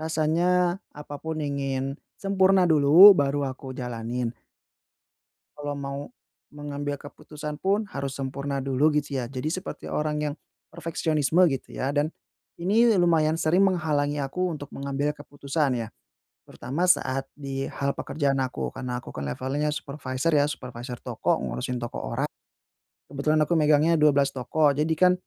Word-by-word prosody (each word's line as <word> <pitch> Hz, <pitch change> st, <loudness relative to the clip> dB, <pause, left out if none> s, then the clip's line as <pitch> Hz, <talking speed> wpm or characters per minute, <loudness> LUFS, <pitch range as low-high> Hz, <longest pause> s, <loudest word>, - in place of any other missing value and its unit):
rasanya 175 Hz, +3 st, +1 dB
apa 145 Hz, -1 st, -9 dB
pun 160 Hz, 0 st, -4 dB
ingin 135 Hz, -1 st, -2 dB, 0.2 s
sempurna 190 Hz, -1 st, +3 dB
dulu 160 Hz, +5 st, +9 dB
baru 145 Hz, -4 st, +1 dB
aku 130 Hz, 0 st, -6 dB
jalanin? 120 Hz, -1 st, -3 dB, 1.2 s
Kalau 145 Hz, -1 st, -4 dB
mau 140 Hz, 0 st, -4 dB, 0.5 s
mengambil 145 Hz, -1 st, -4 dB
keputusan 150 Hz, 0 st, -8 dB
pun 200 Hz, +3 st, +1 dB
harus 140 Hz, -1 st, -4 dB
sempurna 140 Hz, +1 st, -3 dB
dulu 135 Hz, +3 st, +2 dB
gitu 140 Hz, -2 st, -1 dB
ya. 120 Hz, -, -4 dB
Jadi 130 Hz, +3 st, -3 dB
seperti 185 Hz, +1 st, -6 dB
orang 150 Hz, 0 st, -1 dB
yang 145 Hz, -1 st, -2 dB, 0.4 s
perfeksionisme 160 Hz, -1 st, 0 dB
gitu 135 Hz, -4 st, -5 dB
ya. 135 Hz, +2 st, -1 dB
Dan 145 Hz, +1 st, +1 dB, 0.5 s
ini 215 Hz, +7 st, +4 dB
lumayan 165 Hz, -2 st, +3 dB
sering 170 Hz, +4 st, +3 dB
menghalangi 150 Hz, -6 st, +1 dB
aku 175 Hz, +7 st, -1 dB
untuk 145 Hz, -3 st, -7 dB
mengambil 140 Hz, +2 st, -2 dB
keputusan 145 Hz, -2 st, -2 dB
ya. -, -, -12 dB, 0.6 s
Terutama 155 Hz, +8 st, -2 dB
saat 135 Hz, -6 st, +2 dB
di 135 Hz, -2 st, -4 dB
hal 140 Hz, 0 st, -2 dB
pekerjaan 140 Hz, -2 st, -1 dB
aku. 130 Hz, -1 st, -3 dB
Karena 125 Hz, -2 st, -4 dB
aku -, -, -10 dB
kan 70 Hz, 0 st, -4 dB
levelnya 135 Hz, -, -1 dB
supervisor 140 Hz, +1 st, -3 dB
ya, 145 Hz, -1 st, +4 dB
supervisor 125 Hz, -3 st, -6 dB
toko -, -, 0 dB
ngurusin 65 Hz, -, -3 dB
toko 120 Hz, -, -5 dB, 0.2 s
orang. 140 Hz, +5 st, -1 dB, 0.8 s
Kebetulan 150 Hz, +2 st, +1 dB
aku 160 Hz, +3 st, +1 dB
megangnya 155 Hz, +2 st, +4 dB
12 145 Hz, -2 st, +4 dB
toko. 145 Hz, +4 st, +2 dB
Jadi 150 Hz, +3 st, +1 dB
kan 180 Hz, +3 st, +5 dB
145 Hz, 140 wpm, -26 LUFS, 135-160 Hz, 1.2 s, dulu